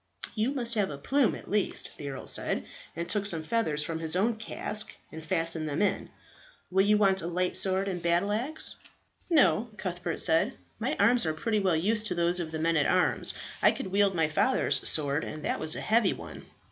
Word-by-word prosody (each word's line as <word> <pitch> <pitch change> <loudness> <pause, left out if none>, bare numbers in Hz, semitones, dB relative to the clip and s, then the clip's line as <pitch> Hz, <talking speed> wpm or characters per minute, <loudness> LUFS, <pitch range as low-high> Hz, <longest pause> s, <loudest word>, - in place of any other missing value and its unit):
"You 225 +4 0
must 240 -4 -2
have 210 -4 +1
a 140 - -6
plume 265 - +2
at - - -11
least," 210 -1 -1
the 145 - -6
earl 135 -1 -7
said, - - -2 0.3
and 170 +1 -4
took 205 -1 -1
some 165 -5 -1
feathers 155 -6 0
from 160 +1 -4
his 160 +1 -2
own 220 +5 +2
casque 215 -1 -5 0.2
and 160 0 -8
fastened 165 -2 -1
them 145 - -2
in. 205 - -1 0.6
"Will 190 +1 +4
you 210 +1 +4
want 195 -2 +3
a 165 - -4
light 180 +1 -1
sword 190 +1 0
and 180 -3 -3
battle 175 +4 +1
axe?" 260 +9 +1 0.5
"No," 235 - +3
Cuthbert 175 -3 -4
said, 165 -1 +3 0.2
"my - - -1
arms 220 -1 +4
are 155 - -1
pretty 215 +6 0
well 190 -4 +2
used 210 +6 +1
to 180 - -2
those 175 +1 +2
of 170 -2 -3
the 160 - -3
men 165 +1 +1
at 145 - +2
arms. - - +2 0.3
I - - +7
could 190 - -4
wield 200 -1 +3
my 160 -2 +2
father's 155 - +1
sword, 145 0 +1
and 155 -1 -6
that - - -1
was 155 - +2
a - - -4
heavy 220 -3 +3
one." - - -10
185 Hz, 210 wpm, -28 LUFS, 160-210 Hz, 0.6 s, I